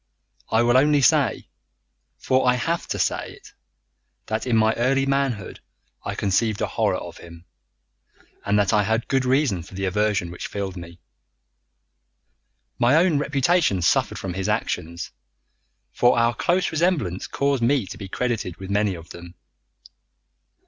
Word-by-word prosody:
I 110 +1 +3
will 120 +1 +4
only 145 +1 +4
say 130 - +2 0.7
for 130 0 +1
I 125 - +3
HAVE 165 +7 -2
to - - -3
say - - -1
it - - -17 0.7
that 110 +2 -3
in 115 -2 +2
my 110 0 +3
early 135 +3 +1
manhood 135 -7 -1 0.4
I - - -4
conceived 105 +2 0
a - - +1
horror - - 0
of - - -9
him, 85 0 -13 1.0
and 100 +1 +1
that 100 -1 +2
I 105 - +4
had 110 +3 -1
good 135 -1 +1
reason 130 - +1
for 90 +3 -13
the 95 0 -2
aversion 100 -2 0
which 90 - -6
filled 100 -2 -5
me. 85 -1 -10 1.8
My 120 +4 +4
own 165 -3 +3
reputation 140 - +1
suffered - - +2
from 95 -2 -5
his 95 +2 -3
actions, 85 -6 -3 0.8
for 125 0 +3
our 115 0 +3
close 180 +7 0
resemblance 155 - 0
caused 140 -2 0
me 125 -1 +2
to - - -9
be 100 - -7
credited 115 -7 -2
with 95 0 -8
many 100 -1 +1
of 85 0 -12
them. 85 0 -11
110 Hz, 155 wpm, -23 LUFS, 95-135 Hz, 1.8 s, will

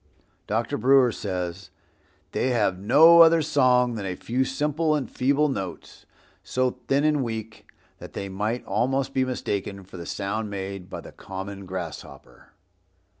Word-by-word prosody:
Dr. 110 +2 -1
Brewer 130 +1 +5
says, 90 -3 -5 0.6
"They - - 0
have 105 -7 +1
no 160 - +7
other 165 -1 +6
song 125 -4 +3
than 105 -3 -5
a 90 - -3
few 125 +7 -1
simple 150 +3 0
and 145 -3 -2
feeble 140 +4 +1
notes, 95 -10 -6 0.4
so 130 -1 -1
thin 140 +1 +2
and 150 -2 +2
weak 110 -1 -6 0.3
that - - -11
they 100 - -4
might 105 +5 -3
almost 130 +6 0
be 130 - +2
mistaken 100 -6 -3
for 90 0 -12
the 85 - -8
sound 105 +2 -3
made 95 -2 -6
by - - -6
the - - -12
common 95 0 -8
grasshopper." 90 -4 -8
115 Hz, 150 wpm, -25 LUFS, 100-135 Hz, 0.6 s, no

